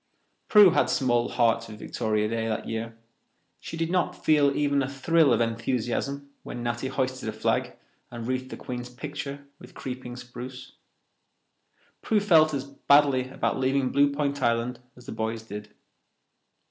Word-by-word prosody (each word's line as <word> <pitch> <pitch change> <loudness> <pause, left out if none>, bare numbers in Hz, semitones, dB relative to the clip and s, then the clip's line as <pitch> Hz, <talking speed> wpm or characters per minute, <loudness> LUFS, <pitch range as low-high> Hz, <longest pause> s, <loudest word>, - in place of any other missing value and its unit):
Prue 205 -4 +8
had - - +2
small 120 -3 +1
heart 115 -2 +2
for 115 - -10
Victoria 105 0 -1
Day 115 0 -2
that 110 - -3
year. 115 0 -4 0.6
She 165 - -7
did 165 0 -1
not 180 -1 +1
feel 145 -3 +4
even 145 -1 +2
a 130 - -2
thrill 150 +2 +3
of 115 - +3
enthusiasm 120 +4 -2
when 120 - -7
Natty 120 +2 -2
hoisted 130 -3 -2
a - - -2
flag 110 - -1 0.4
and 120 -1 -7
wreathed 130 +1 -2
the - - -7
Queen's 125 0 -6
picture 140 +2 -6
with - - -14
creeping 125 -1 -6
spruce. 125 +1 -9 1.3
Prue 220 - +2
felt 165 -6 +5
as 140 -3 -2
badly 140 -1 +3
about 130 - -1
leaving 130 0 +1
Blue 140 0 +4
Point 140 -1 -2
Island 120 0 0 0.2
as 125 - -15
the - - -7
boys 110 0 -3
did. 105 -1 -8
130 Hz, 160 wpm, -26 LUFS, 115-140 Hz, 1.3 s, Prue